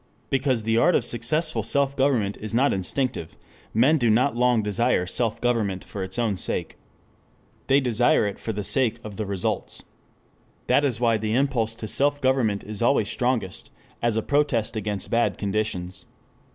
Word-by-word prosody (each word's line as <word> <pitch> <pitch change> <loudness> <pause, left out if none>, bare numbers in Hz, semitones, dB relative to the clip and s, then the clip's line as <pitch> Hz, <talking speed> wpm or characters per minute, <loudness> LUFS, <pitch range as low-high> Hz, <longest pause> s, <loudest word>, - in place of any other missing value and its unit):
Because 130 -4 +1
the 115 +1 +1
art 175 +8 +4
of - - +1
successful 155 +8 +1
self 140 -1 +2
government 125 -8 +1
is 110 +1 -4
not 135 +4 +3
instinctive, 95 - -3 0.3
men 135 +8 +3
do 120 -3 +2
not 125 +5 +2
long 120 -2 +2
desire 105 -1 +1
self 115 +4 -1
government 110 -6 -1
for 100 - -7
its 95 0 -4
own 110 -5 0
sake. - - -3 0.9
They 135 +1 +4
desire 120 -4 +2
it 100 -1 -4
for 115 - -4
the 105 -1 -4
sake 120 +1 +1
of 105 -2 -9
the 110 - -3
results. 95 -2 -3 0.8
That 145 - +3
is 125 -5 0
why 115 -2 +2
the 110 +1 -2
impulse 125 -5 0
to 110 -1 -7
self 145 +6 +2
government 130 -7 +1
is 105 0 -4
always 115 -3 +2
strongest 120 -7 -2 0.3
as 115 -2 +1
a 110 - 0
protest 140 -7 0
against 105 -2 -3
bad 120 0 +1
conditions. 100 -3 -3
115 Hz, 170 wpm, -24 LUFS, 105-130 Hz, 0.9 s, art